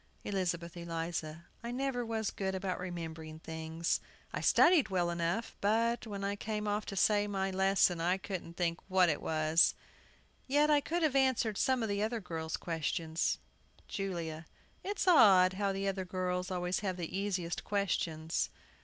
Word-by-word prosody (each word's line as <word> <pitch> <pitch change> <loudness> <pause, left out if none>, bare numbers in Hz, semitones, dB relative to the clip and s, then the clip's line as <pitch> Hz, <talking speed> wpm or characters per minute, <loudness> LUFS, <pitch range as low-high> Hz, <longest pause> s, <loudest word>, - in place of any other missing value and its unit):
ELIZABETH 175 -3 -2
ELIZA. 165 -1 -4 0.2
I 235 - -4
never 250 0 -1
was 225 -2 -2
good 190 -1 -2
about 190 -1 -2
remembering 165 -3 -6
things. 160 +1 -2 0.3
I - - -2
studied 340 -6 +5
well 175 -2 +1
enough, 170 +6 -2
but, 230 +3 +1
when 200 -2 -5
I 200 +1 -1
came 210 0 -3
to 205 -1 -2
say 205 +2 +3
off - - -5
my 195 -1 -1
lesson, 190 -2 +3
I 180 +3 +2
couldn't 185 -3 -6
think 170 -1 0
what 185 -2 +4
it 150 - -1
was. 155 +1 +3 0.7
Yet 295 +3 +3
I 295 -1 +5
could 335 +4 -1
have 300 -4 +2
answered 255 -6 +2
some 260 -3 +2
of 220 - -1
the 200 0 0
other 225 +2 0
girls' 160 -4 -4
questions. 165 0 -1 0.5
JULIA. 170 -5 -4 0.4
It's 400 -1 -2
odd 190 - +7
how 200 +1 0
the 195 +1 -2
other 195 -1 -1
girls 180 0 -2
always 180 0 -1
have 190 -3 -2
the 175 0 -5
easiest 190 -4 -2
questions. 165 -5 -1
190 Hz, 160 wpm, -33 LUFS, 170-210 Hz, 0.7 s, odd